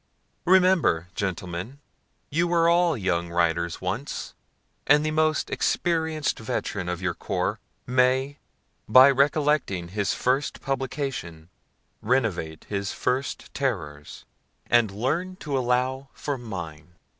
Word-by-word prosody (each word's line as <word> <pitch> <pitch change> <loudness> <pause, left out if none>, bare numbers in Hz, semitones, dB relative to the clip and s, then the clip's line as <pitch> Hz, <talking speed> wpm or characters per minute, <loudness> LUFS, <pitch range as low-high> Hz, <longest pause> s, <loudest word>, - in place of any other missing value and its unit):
Remember, 180 - +4
Gentlemen, 95 +6 -4 0.5
you 165 +4 +2
were 170 -1 +3
all 170 -3 +3
young 85 -4 -1
writers 85 0 0
once, 95 +10 -4 0.5
and 150 +2 +5
the 155 - 0
most 155 0 +1
experienced 160 -3 0
veteran 100 -4 -3
of 90 +1 -4
your 95 -2 0
corps 85 - -2 0.3
may, 130 +3 +2 0.5
by 130 +5 +8
recollecting 140 - +1
his 100 0 -1
first 130 +2 0
publication, 130 - -4 0.5
renovate 105 -10 -1
his 100 -1 -3
first 130 +2 -2
terrors, 75 - -4 0.4
and 120 -3 +3
learn 150 - -2
to 150 -6 -4
allow 130 +1 0
for 145 - -3
mine. 85 - -8
125 Hz, 110 wpm, -25 LUFS, 90-145 Hz, 0.5 s, by